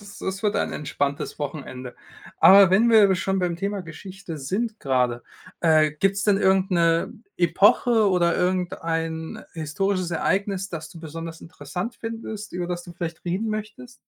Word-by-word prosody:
ist 205 Hz, -1 st, -12 dB
es 190 Hz, +1 st, -4 dB
wird 210 Hz, -, +2 dB
ein -, -, -1 dB
entspanntes 145 Hz, 0 st, -3 dB
Wochenende. 130 Hz, -4 st, -6 dB, 0.4 s
Aber 195 Hz, 0 st, +8 dB
wenn 210 Hz, +5 st, +4 dB
wir 215 Hz, -4 st, +6 dB
schon 190 Hz, +1 st, -1 dB
beim 175 Hz, -2 st, -1 dB
Thema 200 Hz, +2 st, -3 dB
Geschichte 185 Hz, 0 st, -9 dB
sind 215 Hz, -, -3 dB
grade, 125 Hz, -3 st, 0 dB, 0.4 s
äh, 155 Hz, -2 st, +4 dB
gibt's 195 Hz, +6 st, 0 dB
denn 205 Hz, -1 st, +3 dB
irgend 190 Hz, 0 st, +2 dB
'ne 170 Hz, -2 st, +2 dB, 0.2 s
Epoche 205 Hz, +6 st, +4 dB
oder 175 Hz, -3 st, +2 dB
irgendein 165 Hz, -3 st, -2 dB
historisches 180 Hz, +4 st, -1 dB
Ereignis, 195 Hz, +3 st, -1 dB
das 160 Hz, -4 st, -6 dB
du 165 Hz, -, -12 dB
besonders 165 Hz, +1 st, -7 dB
interessant 170 Hz, -, -6 dB
findest, 225 Hz, -2 st, -6 dB
über 180 Hz, 0 st, -3 dB
das 175 Hz, -1 st, -4 dB
du 175 Hz, -, -10 dB
vielleicht 170 Hz, -2 st, -6 dB
reden 185 Hz, +6 st, -2 dB
möchtest? 215 Hz, +4 st, -6 dB
180 Hz, 155 wpm, -24 LUFS, 160-200 Hz, 0.4 s, Aber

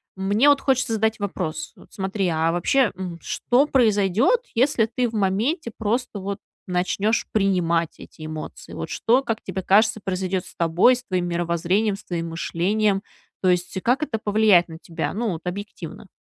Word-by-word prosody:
мне 200 Hz, +7 st, +2 dB
вот 285 Hz, -1 st, +5 dB
хочется 260 Hz, -3 st, +1 dB
задать 220 Hz, 0 st, 0 dB
вопрос: 180 Hz, -6 st, -4 dB
вот -, -, -18 dB
смотри, 190 Hz, -1 st, -2 dB
а 165 Hz, 0 st, +1 dB
вообще, 230 Hz, +8 st, +2 dB
м, 180 Hz, -2 st, -6 dB
что 250 Hz, +4 st, +1 dB
произойдёт, 225 Hz, -, +3 dB
если 250 Hz, -1 st, +3 dB
ты 240 Hz, +2 st, -1 dB
в -, -, -13 dB
моменте 220 Hz, -, 0 dB
просто 225 Hz, 0 st, -1 dB
вот 195 Hz, +1 st, -4 dB, 0.3 s
начнёшь 190 Hz, +5 st, 0 dB
принимать 175 Hz, -5 st, +1 dB
эти 155 Hz, -, -11 dB
эмоции? 155 Hz, 0 st, -8 dB
Вот -, -, -5 dB
что, 245 Hz, +4 st, +2 dB
как 225 Hz, -4 st, -3 dB
тебе 190 Hz, 0 st, -4 dB
кажется, 220 Hz, +3 st, +4 dB
произойдёт 185 Hz, -1 st, -2 dB
с -, -, -14 dB
тобой, 170 Hz, +9 st, +4 dB
с 250 Hz, -, -9 dB
твоим 185 Hz, -6 st, -1 dB
мировоззрением, 175 Hz, +4 st, 0 dB
с 210 Hz, -, -16 dB
твоим 170 Hz, -2 st, -3 dB
мышлением? 195 Hz, +5 st, 0 dB, 0.4 s
То 185 Hz, -, +3 dB
есть, 180 Hz, +1 st, 0 dB
как 250 Hz, +4 st, +2 dB
это 235 Hz, -7 st, -2 dB
повлияет 205 Hz, -4 st, +4 dB
на 160 Hz, -, -8 dB
тебя, 165 Hz, -, -4 dB
ну, 220 Hz, -1 st, -1 dB
вот 165 Hz, -, -5 dB
объективно? 200 Hz, +4 st, -7 dB
200 Hz, 170 wpm, -23 LUFS, 180-225 Hz, 0.4 s, вот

